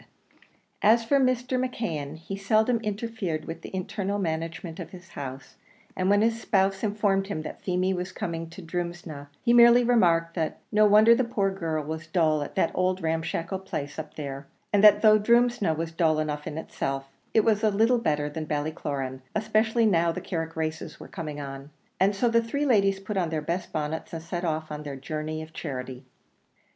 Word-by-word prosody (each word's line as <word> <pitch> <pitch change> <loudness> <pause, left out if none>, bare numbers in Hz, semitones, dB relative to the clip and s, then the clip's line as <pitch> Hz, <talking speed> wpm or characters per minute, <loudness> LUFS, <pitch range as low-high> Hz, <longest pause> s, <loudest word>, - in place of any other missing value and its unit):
And 215 - +7
as 230 0 0
for 280 +4 +3
Mr. 255 0 +1
McKeon, 160 - -3
he 165 +4 -6
seldom 220 +4 +2
interfered 210 -6 -3
with 165 - -7
the - - -8
internal 195 +2 -2
management 165 -1 -3
of - - -6
his 185 -1 -13
house, 135 -4 -8 0.4
and 185 +1 0
when 205 +1 +4
his 225 0 +1
spouse 195 -2 +1
informed 205 -2 +1
him 175 -6 -4
that - - -8
Feemy 185 0 0
was 180 0 -4
coming 165 -1 -4
to 175 +3 -10
Drumsna, 170 -4 -5 0.2
he 235 - +3
merely 240 0 +7
remarked 170 -9 +3
that 160 -3 -2
"no 215 0 +5
wonder 215 +3 +7
the 255 +2 +2
poor 200 -5 0
girl 165 -5 -2
was 160 +2 -5
dull 155 -3 +2
at 145 - -6
that 190 - +2
old 185 0 0
ramshackle 165 +3 -2
place 145 -6 -5
up 155 -1 -7
there, 140 -2 -6 0.3
and 205 0 +4
that 210 0 +7
though 215 -1 +7
Drumsna 235 -5 +3
was 165 0 -3
dull 165 -1 +2
enough 150 -1 -2
itself, 135 -3 -4 0.3
it 220 - +6
was 215 -2 +3
a 215 - +5
little 225 +4 +3
better 150 -8 0
than 155 +1 -5
Ballycloran, 145 -3 -3
especially 220 +2 +2
now 170 -5 +3
the - - -4
Carrick 165 -2 -4
races 160 0 -4
were - - -10
coming 155 -5 -6
on;" 135 0 -7 0.3
and 195 +2 +3
so 240 +5 +2
the 230 0 +4
three 280 +6 -2
ladies 195 -6 +3
put 195 +1 -5
on 175 -3 +1
their 160 -1 -1
best 170 +4 -3
bonnets 155 +1 -3
and 165 -1 -5
set 170 +1 -4
off 155 -2 -2
on 150 0 -5
their 145 -2 -6
journey 155 +3 -4
of 160 +1 -13
charity. 130 -4 -6
175 Hz, 195 wpm, -27 LUFS, 155-215 Hz, 0.4 s, And